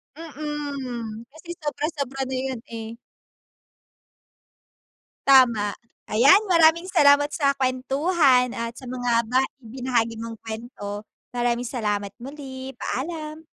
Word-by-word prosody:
Mm, 280 -7 -5
kasi 320 +3 -15
sobra-sobra 290 -3 -3
na 265 - -2
yun, 260 -3 -3
eh. 225 0 -6 2.3
Tama. 235 -7 +5 0.3
Ayan, 270 - +6
maraming 335 0 +5
salamat 290 -4 +5
sa 280 -3 +3
kuwentuhan 260 0 +2
at 230 0 -3
sa 260 - -10
mga 245 -2 0
ba 255 +3 +3 0.2
ibinahagi 235 -1 -1
mong 225 0 -7
kuwento. 220 -2 -7 0.3
Maraming 240 0 0
salamat, 205 -4 -2
muli 265 0 -8
paalam. 310 +2 -4
260 Hz, 100 wpm, -24 LUFS, 230-290 Hz, 2.3 s, Ayan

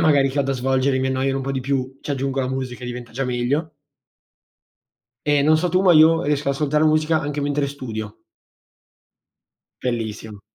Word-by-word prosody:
magari 145 -4 +4
che 135 - -4
ho 140 - +4
da 135 - -1
svolgere 130 +1 +1
e - - 0
mi 130 - 0
annoiano 135 +1 0
un 135 - -4
po' 135 - -3
di 130 - -2
più. 135 0 -2
Ci - - -7
aggiungo 135 0 -1
la 130 - -1
musica 130 -1 -4
e - - -5
diventa 120 -1 -7
già 135 +3 -2
meglio. 125 +6 -1 1.6
E - - +4
non 155 - +5
so 180 - +1
tu, 180 - +2
ma 180 - +6
io 165 +1 +5
riesco 145 -1 0
ad 140 - +1
ascoltare 150 +1 +1
musica 155 +1 +3
anche 145 0 -3
mentre 145 0 0
studio. 110 -6 -7 1.6
Bellissimo. 110 -4 -4
135 Hz, 195 wpm, -21 LUFS, 130-145 Hz, 1.6 s, ma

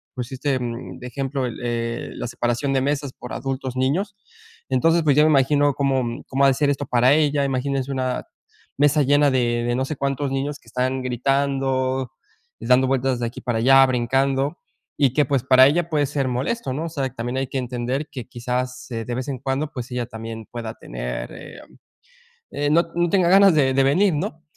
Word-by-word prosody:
pues, 125 -1 -5
este 135 0 -1
de 120 +1 -6
ejemplo, 135 0 -3
eh, 115 0 -4
la - - -4
separación 120 +3 -1
de 135 - +2
mesas 140 0 -1
por 125 - -10
adultos, 130 0 -4
niños, 175 +11 0 0.5
entonces 165 +6 +3
pues, 145 -2 +3
yo 150 - +7
me 155 - +4
imagino 145 0 +3
cómo 130 -4 -1
cómo 135 +1 0
ha - - +7
de 135 - +4
ser 145 +1 +1
esto 145 0 -3
para 125 +2 +4
ella. 145 -2 +2
Imagínense 135 0 -1
una 130 -1 -2 0.5
mesa 145 +1 +4
llena 145 +1 +4
de 120 -2 +1
de 120 - 0
no 130 - 0
sé, 155 - -4
cuántos 140 0 -1
niños 140 +2 -2
que - - -27
están 130 +2 -1
gritando, 130 0 0 0.5
dando 130 +1 +3
vueltas 130 -1 0
de 120 - -1
aquí 115 - -8
para 120 -3 -1
allá, 135 +2 +6
brincando 135 +4 0 0.4
y 135 -4 +3
que 150 +1 +3
pues, 135 -2 0
para 130 0 +7
ella 170 +4 +1
puede 150 -3 +1
ser 140 -1 -1
molesto, 130 - -2
¿no? 155 +4 -3
O - - -4
sea, 140 -5 -2
también 120 +1 -4
hay 135 -1 -1
que 135 - -4
entender 125 +4 -3
que 125 -5 -7
quizás, 125 +1 -4
eh, 115 -1 -3
de 120 - -3
vez 130 +2 -4
en 135 -2 -4
cuando, 140 +3 -2
pues, 125 -1 -6
ella 125 -1 -2
también 115 -1 -7
pueda 115 -2 -5
tener, - - -6
eh, - - -11 1.1
mm, 150 - +2
no 170 +1 +5
no 175 0 +1
tenga 185 -2 +3
ganas 195 0 +7
de 135 -3 +3
de 135 0 +3
venir, 180 +8 +3
¿no? 155 +2 -4
135 Hz, 200 wpm, -22 LUFS, 125-145 Hz, 1.1 s, yo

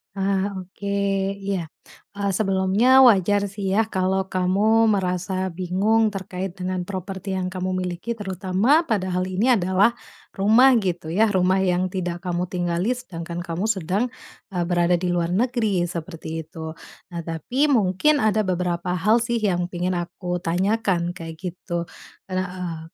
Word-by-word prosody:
Ah, 195 0 0
oke. 190 +2 -12 0.6
Iya. 195 -3 -2 0.5
E - - -8 0.2
sebelumnya 195 +2 +2 0.2
wajar 205 -1 +4
sih 200 -1 -5
ya 220 - +4
kalau 190 +1 +1
kamu 205 +5 +3
merasa 185 -1 -1 0.2
bingung 195 +5 +2
terkait 190 -1 -5
dengan 180 -1 -2
properti 190 0 -5
yang 185 -1 -2
kamu 185 0 -2
miliki 180 +6 -3
terutama 205 - +1
padahal 185 -4 0
ini 185 +5 -1
adalah 190 +3 +3 0.5
rumah, 220 +7 +6
gitu 175 -6 -2
ya. 210 +5 +2
Rumah 185 0 +3
yang 180 +1 +1
tidak 175 -2 -3
kamu 180 0 -1
tinggali, 175 +5 -1
sedangkan 170 -8 -6
kamu 175 +3 -3
sedang, 195 0 0 0.5
e 180 - -3
berada 175 0 +2
di 180 - 0
luar 175 0 0
negeri, 220 -3 +1
seperti 165 -1 -6 0.2
itu. 160 0 -8 0.3
Nah, 170 -1 -5
tapi 170 - 0
mungkin 260 +3 +3
ada 215 -1 +2
beberapa 180 -1 -1
hal 210 +6 +3
sih 235 0 -1
yang 180 -4 +1
pingin 180 0 -2
aku 175 +1 -4
tanyakan, 185 0 +1
kayak 165 -1 -8
gitu. 175 -2 -4 0.4
Ada, 185 0 0 0.2
eee, 170 -3 -4
185 Hz, 145 wpm, -23 LUFS, 175-205 Hz, 0.6 s, rumah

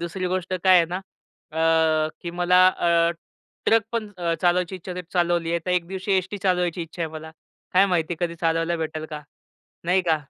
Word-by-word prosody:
दुसरी 175 +2 -3
गोष्ट 185 0 -2
काय 185 -1 +7
आहे 170 - +5
ना? 180 - -3 0.6
अ, 160 -1 +2
की 170 - -4
मला 180 +1 +4
अ, 170 -2 +2 0.6
ट्रक 225 0 +5
पण 220 -3 -2
अ, 170 -1 0
चालवायची 180 +1 +2
इच्छा 185 0 -7
होते, 180 0 -5
चालवली 175 -2 +1
आहे. 170 - +1
तर - - 0
एक 180 -2 +1
दिवशी 190 +2 -3
एसटी 185 +2 -2
चालवायची 180 -2 0
इच्छा 165 +1 -6
आहे 160 - -2
मला, 160 0 -8 0.4
काय 190 +2 +5
माहिती 175 -3 0
कधी 170 -1 -1
चालवायला 165 +1 +1
भेटेल 160 -1 -4
का? 150 -1 -6 0.6
नाही 185 +2 +3
का? 165 -3 +2
175 Hz, 190 wpm, -24 LUFS, 165-185 Hz, 0.6 s, काय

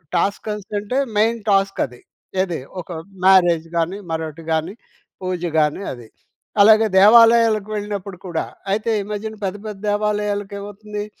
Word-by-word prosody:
టాస్కస్ 205 +3 -1
అంటే, 210 +6 -3 0.2
main 225 +2 +2
task 195 0 +2
అది. 125 0 -16 0.4
ఏది 175 -6 -4 0.2
ఒక 170 - -17 0.4
మ్యారేజ్ 175 -4 +5
గాని, 175 +5 -1
మరొకటి 160 0 -4
గాని, 160 +5 -1 0.5
పూజ 185 -2 -3 0.2
గాని 150 +6 +1
అది. 120 -3 -12 0.5
అలాగే 220 +1 +7
దేవాలయాలకు 225 0 +6
వెళ్ళినప్పుడు 205 -2 -5
కూడా 170 -2 -2 0.3
అయితే, 220 +2 -1
ఈ - - -5
మధ్యన 215 +1 -4
పెద్ద, 190 +1 -3
పెద్ద 205 -2 -7
దేవాలయాలకి 205 -1 -1
ఏమవుతుంది! 205 +1 -7
200 Hz, 135 wpm, -20 LUFS, 180-210 Hz, 0.5 s, అలాగే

